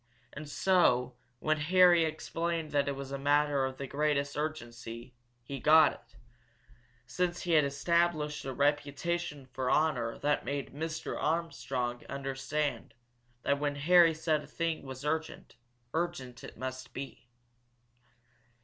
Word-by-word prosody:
And 150 0 -8
so, 135 -9 +3 0.2
when 155 +5 +1
Harry 175 +1 +5
explained 165 0 -3
that 145 -1 +1
it 140 - -1
was 135 0 -7
a 140 - -3
matter 145 -1 +2
of 130 0 -5
the 140 - -4
greatest 145 0 0
urgency, 120 -5 -5 0.3
he 135 +3 -6
got 155 +3 +6
it - - -18 0.9
since 175 +7 -2
he 175 - -2
had 155 -3 +5
established 150 +1 0
a 135 - -4
reputation 145 +2 -1
for 130 0 -3
honor 125 -8 +1
that 145 0 0
made 140 +1 -4
Mr. 160 +2 -4
Armstrong 135 -7 -2
understand 135 -2 -3 0.5
that 140 0 +1
when 145 -1 -1
Harry 165 +2 +5
said 155 -1 0
a - - -12
thing 165 -1 -2
was 135 0 -8
urgent, 160 -4 -3 0.4
urgent 160 -8 -3
it - - -10
must 130 0 -6
be. 135 -2 -7
145 Hz, 135 wpm, -31 LUFS, 135-160 Hz, 0.9 s, got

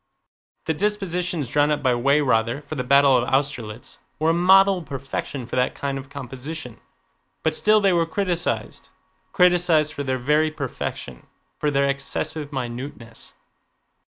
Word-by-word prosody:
The 160 - 0
dispositions 180 - -1
drawn 145 +4 +2
up 150 -1 -1
by 130 -2 +3
Weyrother 125 -1 +1
for 145 - -7
the 130 -4 -2
battle 140 +1 +5
of 125 -1 +1
Austerlitz 130 -5 -2 0.2
were 160 +1 +2
a - - +1
model 190 +2 +5
of 165 - -12
perfection 135 -1 -5
for 120 - -6
that 125 - +1
kind 140 -1 -3
of 135 +1 -11
composition, 135 -1 -8 0.6
but 160 - +1
still 215 +6 +3
they 195 -2 +3
were 170 -1 +2
criticized—criticized 175 -2 0
for 140 - -4
their 130 -1 -1
very 150 +5 +2
perfection, 130 - -6 0.3
for 150 - +1
their 140 -1 +2
excessive 145 +2 -2
minuteness. 120 -2 -7
145 Hz, 145 wpm, -23 LUFS, 130-165 Hz, 0.6 s, battle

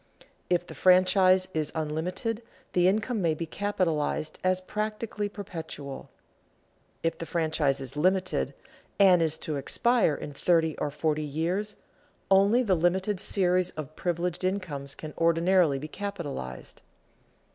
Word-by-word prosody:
If 175 -1 +1
the - - -10
franchise 185 0 +4
is 155 -2 -1
unlimited, 180 +9 -2 0.3
the 180 0 +4
income 215 +3 +1
may 165 -3 +1
be 165 - -4
capitalized 165 -5 -1
as 185 0 +2
practically 210 +2 -3
perpetual; 160 -8 -7 0.9
if 165 0 -1
the 165 - -5
franchise 155 -4 +1
is 135 0 -5
limited, 185 +4 +1 0.4
and 185 -4 +6
is 160 -1 +1
to 155 -2 -3
expire 230 - +2
in 145 - -7
thirty 160 +1 +2
or 150 - -1
forty 150 +1 -1
years, 170 +8 -2 0.6
only 200 +6 +5
the 200 -5 +2
limited 185 +3 +1
series 185 -3 +2
of 155 0 -6
privileged 175 +1 -2
incomes 170 -8 -2
can 155 -1 -8
ordinarily 170 -2 +3
be 145 +3 -6
capitalized. 155 - -6
175 Hz, 130 wpm, -28 LUFS, 155-190 Hz, 0.9 s, and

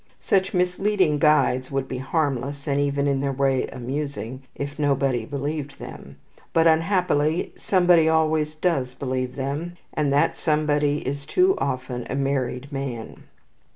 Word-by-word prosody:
Such 190 -1 +1
misleading 180 -3 +1
guides 140 -4 +3
would 135 -1 -2
be 130 - -4
harmless, 140 -1 -1
and 140 -1 0
even 140 0 0
in 140 -1 +1
their 140 0 0
way 135 -1 +1
amusing, 130 -1 -5
if 140 +1 -5
nobody 135 -5 +1
believed 145 0 -4
them; 70 - -10 0.4
but 165 0 +4
unhappily 165 -2 +2
somebody 175 -4 +4
always 155 -1 +1
does 140 -7 0
believe 130 -2 -3
them, 145 +6 -3 0.2
and 150 -2 0
that 145 +4 +3
somebody 150 -2 +1
is 140 +1 -3
too 370 +1 +4
often 130 -2 -3
a - - -2
married 135 0 -1
man. 135 -5 -5
140 Hz, 140 wpm, -24 LUFS, 135-160 Hz, 0.4 s, but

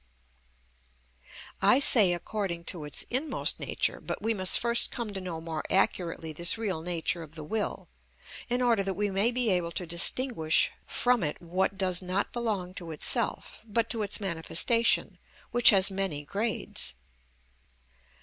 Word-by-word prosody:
I 200 +6 +5
say 225 -9 +7
according 175 -1 -4
to 160 -4 -8
its 145 - 0
inmost 270 +6 0
nature; - - -2
but - - -5
we 225 +1 -1
must 185 -3 +2
first 235 0 +2
come 230 -4 -6
to 190 - -5
know 175 -3 -6
more 160 -1 -6
accurately 170 -4 -1
this 170 +6 +2
real 200 -8 -3
nature 170 0 -3
of 160 0 -12
the 155 - -8
will, 210 +7 -4 0.6
in 245 +1 0
order 235 -4 +2
that 195 -1 -3
we 205 -1 -2
may 195 +4 +2
be 245 -3 0
able 175 -2 0
to 180 - -4
distinguish 170 0 +2 0.2
from 245 -2 0
it 150 -3 -2
what 185 +3 -2
does 185 -2 0
not 185 +2 -3
belong 210 -7 -3
to 175 -2 -8
itself, 215 - +1
but 230 +1 -2
to 230 - -1
its 205 -1 -1
manifestation, 195 +5 +1 0.3
which 240 -1 +6
has 195 -1 +4
many 190 -7 -2
grades. 210 - -2
195 Hz, 155 wpm, -27 LUFS, 170-225 Hz, 0.6 s, say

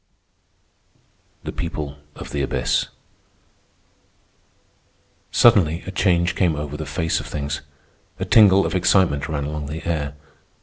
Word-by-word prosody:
THE - - -4
PEOPLE 75 -3 -5 0.2
OF - - -9
THE 70 - -2
ABYSS 65 - 0 2.4
Suddenly 95 -8 +4
a 95 - -5
change 90 -2 +2
came 85 -3 +1
over 75 0 -5
the 75 -1 -6
face 80 +3 -1
of - - -8
things. 70 -1 -4 0.6
A - - -2
tingle 100 -3 +6
of - - -2
excitement 90 -5 +2
ran 75 -2 -2
along 75 0 -4
the 80 +3 -6
air. 75 -4 -2
80 Hz, 125 wpm, -22 LUFS, 75-90 Hz, 2.4 s, tingle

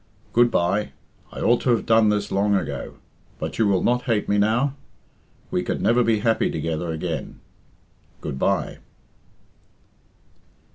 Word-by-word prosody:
"Good 120 +1 +5
bye! 100 +1 0 0.4
I - - -7
ought 120 +1 +3
to - - -1
have 120 -2 +2
done 110 -1 +4
this 105 -1 -1
long 100 +1 +2
ago. 95 - -3 0.4
But - - -5
you 110 - +4
will 95 -2 +2
not 125 +1 +1
hate 110 -4 0
me 100 0 +2
now? 120 +7 +2 0.8
We - - 0
could - - -3
never 120 +1 +3
be 110 -2 +1
happy 115 0 +2
together 80 +1 -3
again. 80 0 -4 0.8
Good 65 - -5
bye!" - - 0
105 Hz, 145 wpm, -23 LUFS, 95-115 Hz, 0.8 s, Good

